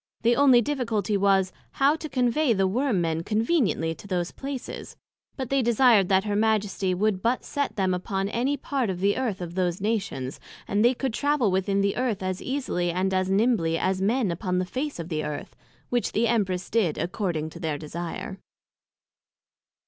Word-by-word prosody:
The 235 +1 +4
onely 255 -3 +6
difficulty 225 -7 -1
was, 195 -1 +2 0.2
how 280 +2 +3
to 310 -1 -7
convey 250 +1 +2
the 195 -2 +2
Worm 225 0 +1
men 165 -1 0
conveniently 215 - +1
to 200 - -13
those 180 -2 -1
places; 270 -2 -6 0.4
but 260 -2 -4
they 275 -1 +3
desired 235 -4 +4
that 190 -1 +4
her 205 -1 -1
Majesty 205 -3 +1
would 200 0 0
but 240 +4 0
set 285 -1 -2
them 190 -2 +1
upon 195 +2 -2
any 250 +7 0
part 265 -4 -1
of 180 -2 -3
the 200 +2 +2
Earth 235 -8 -2
of 170 -1 -5
those 180 -1 0
Nations, 195 - -2 0.3
and 205 +2 +1
they 245 +2 +4
could 260 -1 -2
travel 285 -6 +1
within 195 +1 +1
the 200 0 0
Earth 235 -6 -1
as 185 0 -2
easily, 250 -10 -1
and 185 +2 0
as 185 0 +1
nimbly 195 -5 +2
as 185 +2 0
men 215 0 +1
upon 180 +1 -2
the 185 - 0
face 280 +9 -4
of 170 0 -6
the 155 -2 -2
Earth; 150 -1 -5 0.3
which 245 -1 0
the 235 +2 +2
Empress 190 -6 0
did 200 -9 +1
according 170 -3 -2
to - - -10
their 155 -3 -2
desire. 170 +6 -6
200 Hz, 185 wpm, -26 LUFS, 185-240 Hz, 0.4 s, onely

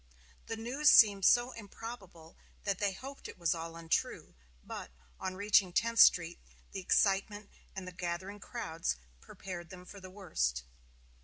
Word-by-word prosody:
The 225 - -4
news 260 +6 +2
seemed 200 -4 +7
so 245 +1 +5
improbable 200 -7 -10 0.3
that 200 -2 -1
they 205 -1 +1
hoped 270 +8 -9
it - - -11
was 170 -1 +1
all 165 0 -6
untrue; 165 -1 -2 0.3
but, - - -7 0.3
on 185 0 -4
reaching 200 -1 +3
Tenth 230 +5 0
Street, 175 -6 +6 0.3
the 195 - -5
excitement 200 +2 +1 0.2
and 190 -1 -6
the - - -6
gathering 180 +3 -5
crowds 165 - -3 0.2
prepared 175 - -9
them 180 -1 -11
for 200 - -11
the 185 -1 -10
worst. 110 - -2
190 Hz, 150 wpm, -32 LUFS, 175-210 Hz, 0.3 s, seemed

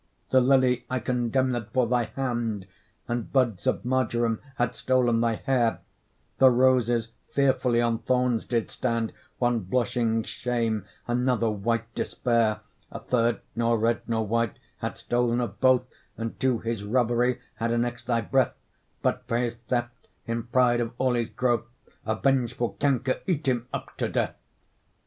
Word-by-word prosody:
The 130 - +6
lily 130 -1 +3
I 130 - 0
condemned 125 -1 0
for 130 -2 +3
thy 120 0 +1
hand, 120 -5 -2 0.4
And 120 -1 -3
buds 125 -5 +1
of 130 - 0
marjoram 120 -3 +1
had 120 0 +1
stol'n 120 -3 +2
thy 115 -1 +2
hair; 120 -2 +1 0.6
The 130 - +8
roses 120 -2 +3 0.2
fearfully 130 -3 +2
on 115 -1 +1
thorns 125 -1 +1
did 115 -3 -1
stand, 115 -3 -1 0.2
One 120 -1 +2
blushing 115 +2 0
shame, 115 -2 -2 0.2
another 120 -2 +1
white 115 +2 -2
despair; 115 -3 0 0.3
A - - -5
third, 120 -2 +1
nor 115 0 +2
red 115 +1 +1
nor 110 -1 0
white, 115 0 0 0.2
had - - -3
stol'n 120 0 +1
of 105 -5 -4
both, 130 -1 +5 0.3
And 115 0 -5
to 130 -2 +2
his 115 -2 -3
robbery 120 +2 +1 0.2
had 115 0 -1
annex'd 120 0 -1
thy 120 -2 +2
breath; 130 +4 +1 0.5
But, 125 -1 0
for 115 -1 +1
his 120 -1 0
theft, 120 0 -4 0.2
in 115 0 -3
pride 120 -1 +3
of 115 - -3
all 130 -1 +2
his 120 -2 0
growth 120 -2 0 0.4
A 110 - +1
vengeful 125 -3 +1
canker 130 -2 +1
eat 160 -6 0
him 120 -2 +1
up - - -6
to - - -1
death. - - -1
120 Hz, 155 wpm, -26 LUFS, 115-125 Hz, 0.6 s, The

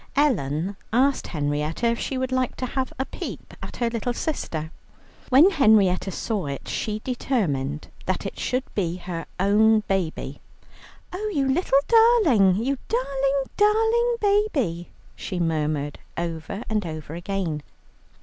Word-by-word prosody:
Ellen 190 - +1 0.2
asked 265 +4 +2
Henrietta 150 +6 -2
if 235 0 +2
she 265 - -2
would 260 0 -2
like 255 -1 0
to 255 - -3
have 260 +1 -2
a 265 - -1
peep - - -7
at - - -7
her 240 - +1
little 230 +1 -2
sister. 165 - -3 0.6
When 295 +9 +7
Henrietta 215 - +4
saw 195 -2 -2
it, 140 -1 -5
she 215 0 -2
determined 155 - -1 0.2
that - - -1
it - - -5
should 255 +1 0
be 175 -4 -1
her 175 -2 -6
own 215 +3 +4
baby. 190 -6 -3 0.7
"Oh, 425 +4 -3
you 280 -7 +1
little 275 0 +2
darling, 430 - +5
you 255 +6 -1
darling, 270 +2 0
darling 450 +3 +3
baby!" 325 - +1 0.3
she 185 -3 -4
murmured 150 -3 -1 0.2
over 170 +5 -4
and 215 -1 0
over 155 -2 -6
again. 175 -3 -3
220 Hz, 140 wpm, -24 LUFS, 170-270 Hz, 0.7 s, When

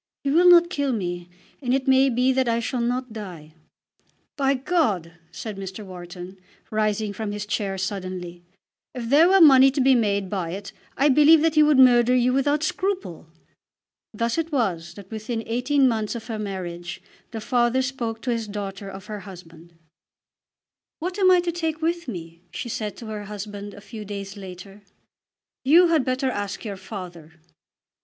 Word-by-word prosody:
He 275 - 0
will 350 +4 +6
not 345 0 +6
kill 285 -5 0
me, 175 -4 -4 0.3
and 255 -1 +1
it 270 0 -2
may 265 +1 +5
be 250 +2 +2
that 260 -2 +1
I 230 0 +1
shall 240 +1 -2
not 250 0 -2
die." 175 -8 -9 0.8
"By 275 -1 +2
God!" 255 - 0 0.2
said 210 +4 -7
Mr. 195 +2 -7
Wharton, 180 0 -9 0.3
rising 215 -1 0
from 210 +1 -4
his 205 0 -4
chair 200 -2 -2
suddenly, 185 -2 -5 0.5
"if 240 -2 -5
there 310 +6 +6
were 390 +1 +5
money 270 -5 +8
to 275 - -3
be 265 0 +5
made 200 -5 +1
by 180 -3 -3
it, 195 +1 -7 0.3
I 280 +3 +4
believe 300 +3 +6
that 325 -1 +2
he 305 - +5
would 300 -2 +5
murder 250 -1 +6
you 250 0 +3
without 285 +3 +1
scruple." 360 - -3 0.8
Thus 230 +6 -1
it 330 0 -3
was 180 - -1
that 200 0 -12
within 225 +1 -4
eighteen 260 +4 +2
months 220 -2 -1
of 230 - -6
her 225 -3 -5
marriage 175 -4 -5 0.3
the 225 - -6
father 240 +3 +1
spoke 235 -4 -4
to 250 - -1
his 230 -2 -2
daughter 200 -1 -6
of 190 0 -10
her 210 -1 -6
husband. 170 -4 -13 1.3
"What 360 +4 -4
am 375 -2 +5
I 365 -1 +6
to 350 -1 -2
take 325 -2 -3
with 340 +1 -1
me?" 170 -6 -8
she 240 - -6
said 215 -2 -4
to 235 - -9
her 210 -1 -6
husband 205 0 -7
a 205 - -12
few 215 +1 -9
days 200 -1 -7
later. 195 +1 -10 0.8
"You 335 +6 +6
had 320 -5 +3
better 255 +1 -1
ask 205 -1 -5
your 200 -3 -5
father." 175 -6 -9
225 Hz, 180 wpm, -24 LUFS, 195-270 Hz, 1.3 s, money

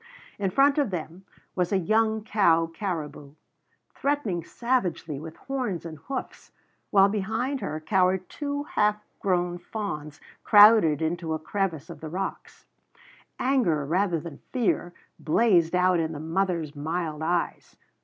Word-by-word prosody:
In 195 -2 0
front 275 +8 +4
of 280 -6 +1
them 175 +1 -6 0.3
was 180 -2 0
a 195 - +3
young 220 +3 +1
cow 170 -7 +3
caribou, 160 -5 -5 0.6
threatening 255 - -1
savagely 180 - -1
with 160 +1 -9
horns 250 -11 -3
and 160 -2 -8
hoofs, 265 -1 -6 0.4
while 195 -1 +6
behind 220 +7 -2
her 155 +1 -3
cowered 185 +2 +1
two 285 -1 -4
half 210 -7 +1 0.2
grown 175 -2 0
fawns 165 -7 -6 0.2
crowded 205 -8 +7
into 165 0 -1
a - - -1
crevice 165 -2 -3
of - - -10
the 160 - -6
rocks. 190 +4 -5 0.7
Anger, 220 - +1
rather 175 +2 +1
than 155 -2 -9
fear, 225 -8 0 0.3
blazed 175 -1 +3
out 180 -1 +3
in 160 0 -1
the 145 - -6
mother's 165 -2 -1
mild 155 +1 -3
eyes. 170 +2 -2
180 Hz, 135 wpm, -26 LUFS, 160-215 Hz, 0.7 s, crowded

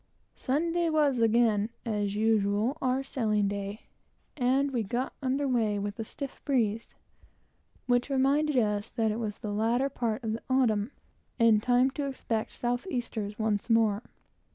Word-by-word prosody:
Sunday 335 +5 0
was 295 -5 +2
again, 225 -2 +3 0.2
as 205 -3 -1
usual, 215 +3 +2
our 260 +1 +1
sailing 215 -6 0
day, 200 +1 -4 0.5
and 270 +1 +2
we 245 -3 0
got 240 +5 -2
under 275 +1 0
weigh 225 -5 +1
with 205 +2 -4
a - - -1
stiff 275 +4 -7
breeze, 230 -5 0 0.9
which 245 +2 +1
reminded 280 +2 +2
us 210 -1 +1
that 225 -3 0
it 215 - -3
was 210 -3 -3
the 210 -3 -5
latter 235 +6 +1
part 235 -2 -2
of 220 -1 -1
the 225 - -4
autumn, 235 -5 +2 0.5
and 225 -2 +5
time 250 +3 +3
to 285 +1 -3
expect 230 -5 -3
south 245 +5 -2
easters 220 - -3
once 215 0 -1
more. 225 -2 +3
230 Hz, 155 wpm, -29 LUFS, 215-260 Hz, 0.9 s, and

